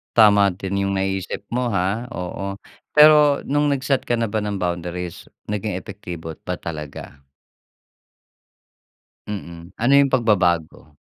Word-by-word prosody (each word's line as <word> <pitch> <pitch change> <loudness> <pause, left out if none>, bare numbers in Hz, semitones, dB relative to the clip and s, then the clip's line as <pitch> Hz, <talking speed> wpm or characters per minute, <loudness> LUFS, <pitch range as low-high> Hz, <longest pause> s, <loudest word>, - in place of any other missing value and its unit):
Tama 100 -3 +6
din 100 +2 -2
yung 100 - -1
naisip 95 -1 -2
mo, 120 -1 -1
ha, 100 +5 0
oo. 95 +2 -4 0.4
Pero 150 -1 +7
nung 145 0 +2
nagset 135 0 0
ka - - -1
na 115 -2 0
ba 110 - -2
ng 100 -2 -3
boundaries 90 0 -4 0.2
naging 105 0 -2
epektibo 90 -5 -7
ba - - -2
talaga? 75 -3 -8 2.0
Mm, 85 -4 -7
ano 120 +4 +2
'yung 140 -1 +5
pagbabago? 85 - +1
100 Hz, 125 wpm, -22 LUFS, 90-120 Hz, 2.0 s, Pero